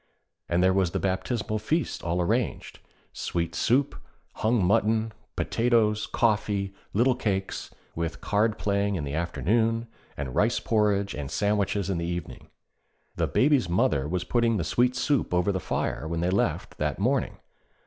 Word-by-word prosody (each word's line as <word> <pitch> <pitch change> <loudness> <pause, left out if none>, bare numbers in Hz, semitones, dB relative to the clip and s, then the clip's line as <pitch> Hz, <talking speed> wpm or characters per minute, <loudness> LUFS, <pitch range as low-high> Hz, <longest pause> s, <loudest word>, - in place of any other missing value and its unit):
And 85 +1 +2
there 95 0 +4
was 95 -3 +1
the - - 0
baptismal 105 +3 -1
feast 155 +10 -1
all 85 +2 -1
arranged: 110 +6 -1 0.3
sweet 85 -1 -2
soup, 130 - +2 0.4
hung 110 -3 +2
mutton, 110 +4 +2 0.2
potatoes, 115 -3 +1
coffee, 105 -4 0 0.2
little 125 +5 +3
cakes, 95 -6 -2 0.2
with 85 0 -3
card 105 +1 +1
playing 100 0 0
in 80 - -2
the 70 0 -4
afternoon, 110 +8 0 0.3
and 70 -3 -4
rice - - +2
porridge 105 -3 +1
and 70 -2 -5
sandwiches 100 +2 0
in 95 -3 -1
the 85 - -2
evening. 85 0 -5 0.7
The - - 0
Baby's 135 - +3
mother 75 -5 +2
was 90 +2 -1
putting 115 -2 +1
the 85 - -1
sweet 125 +10 +2
soup 130 - +1
over 90 +3 +2
the 95 - -1
fire 80 - -2
when 85 +1 -2
they 90 +1 +1
left 100 - -1
that 75 -2 -1
morning. 125 +6 0
100 Hz, 155 wpm, -27 LUFS, 85-115 Hz, 0.7 s, there